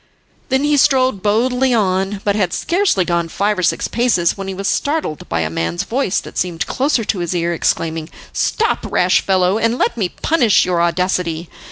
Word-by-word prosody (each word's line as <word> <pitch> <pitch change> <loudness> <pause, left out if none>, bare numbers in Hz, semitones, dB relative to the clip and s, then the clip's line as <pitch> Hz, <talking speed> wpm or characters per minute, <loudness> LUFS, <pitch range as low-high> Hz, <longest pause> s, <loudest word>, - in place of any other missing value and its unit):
Then 265 +1 +1
he 295 0 +2
strode 260 -6 +3
boldly 250 +5 +1
on, 195 -1 0
but 200 -1 +1
had 190 -5 0
scarcely 340 - +1
gone 170 -1 0
five 205 +2 0
or - - 0
six 180 - 0
paces 225 -8 +1
when 195 -1 -6
he 195 - -3
was 195 +1 -3
startled 285 - -2
by 85 - 0
a 80 - -1
man's 80 +1 -2
voice 240 -5 -1
that - - -7
seemed 175 -2 -2
close 280 +4 0
to 220 -4 0
his 175 0 -2
ear, 170 0 0
exclaiming: 160 -1 -1 0.2
"Stop, 445 - 0
rash - - +3
fellow, 190 +1 +1
and 230 +2 +1
let 235 - 0
me 195 -5 0
punish 250 - +2
your 175 -2 0
audacity." 170 -1 -1
195 Hz, 190 wpm, -18 LUFS, 175-245 Hz, 0.2 s, strode